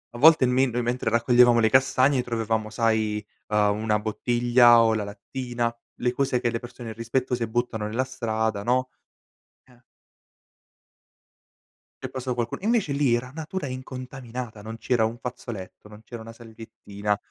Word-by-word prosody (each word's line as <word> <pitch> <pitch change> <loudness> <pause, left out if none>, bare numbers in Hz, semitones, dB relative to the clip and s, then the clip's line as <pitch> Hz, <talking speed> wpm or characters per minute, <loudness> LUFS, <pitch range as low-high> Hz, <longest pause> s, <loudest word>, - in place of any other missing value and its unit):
a - - -5
volte 155 -1 +7
men 130 0 +2
noi 120 +1 -1
mentre 120 +1 -2
raccoglievamo 120 0 +5
le 110 -1 +4
castagne, 130 +1 +3
trovavamo 110 -2 -2
sai, 110 -2 0 0.3
ehm, 105 -1 +2
una 110 -1 +1
bottiglia 120 +2 +4
o 110 -1 +3
la 105 - -1
lattina, 120 +3 -4 0.3
le 125 0 0
cose 130 -2 0
che 120 - +1
le 115 - -2
persone 120 -1 -9
irrispettose 115 +1 -2
buttano 110 -2 -2
nella 115 +5 -1
strada, 110 -5 -2
no. 130 +3 +1 0.8
Eh. 125 -1 -23 2.2
È - - -2
passato 130 -1 -4
qualcu 120 -1 -2
invece 225 -7 +1
lì, 140 -4 +2
era 125 +2 -2
natura 160 0 -5
incontaminata. 125 -3 -7
Non 110 +2 -7
c'era 120 0 +1
un 115 +2 -2
fazzoletto, 115 -5 -8
non 105 +1 -14
c'era 115 0 -9
una 115 0 -10
salviettina. 110 -3 -5
120 Hz, 150 wpm, -25 LUFS, 110-125 Hz, 2.2 s, volte